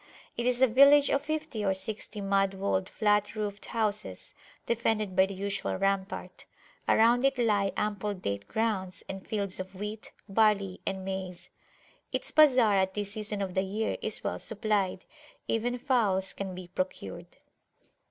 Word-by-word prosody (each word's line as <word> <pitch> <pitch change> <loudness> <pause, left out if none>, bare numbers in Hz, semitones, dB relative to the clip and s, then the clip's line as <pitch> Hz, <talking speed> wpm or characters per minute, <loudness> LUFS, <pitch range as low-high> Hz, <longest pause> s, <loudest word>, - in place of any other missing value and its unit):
It 240 - -1
is 250 +1 +2
a - - +7
village 280 +4 +6
of 275 - +2
fifty 310 -8 -3
or 190 -1 +1
sixty 210 +2 -5
mud 195 0 +1
walled, 190 -1 -1
flat 210 0 +1
roofed 210 -1 -4
houses, 215 -2 -3 0.3
defended 220 -4 0
by 190 +1 +5
the 195 - -7
usual 200 +1 -2
rampart. 195 +1 -2 0.5
Around 235 +3 +5
it 275 -1 +2
lie 210 -5 +2
ample 210 -1 -1
date 100 - -4
grounds, 190 -6 -2
and 195 0 -6
fields 200 -4 +1
of 190 +1 -7
wheat, 210 +3 -6 0.2
barley, 200 -2 +2
and 190 -1 -3
maize. 185 -2 -5 0.6
Its - - -1
bazar 255 -9 +5
at 190 0 +1
this 205 -1 -3
season 210 -1 -3
of 185 -2 -4
the 190 - +2
year 205 +3 -2
is 215 - -2
well - - -2
supplied: 210 -4 0 0.4
even 240 +2 0
fowls 225 -8 +1
can 190 -2 -5
be 180 -1 -8
procured. 180 - -5
205 Hz, 155 wpm, -29 LUFS, 190-225 Hz, 0.6 s, a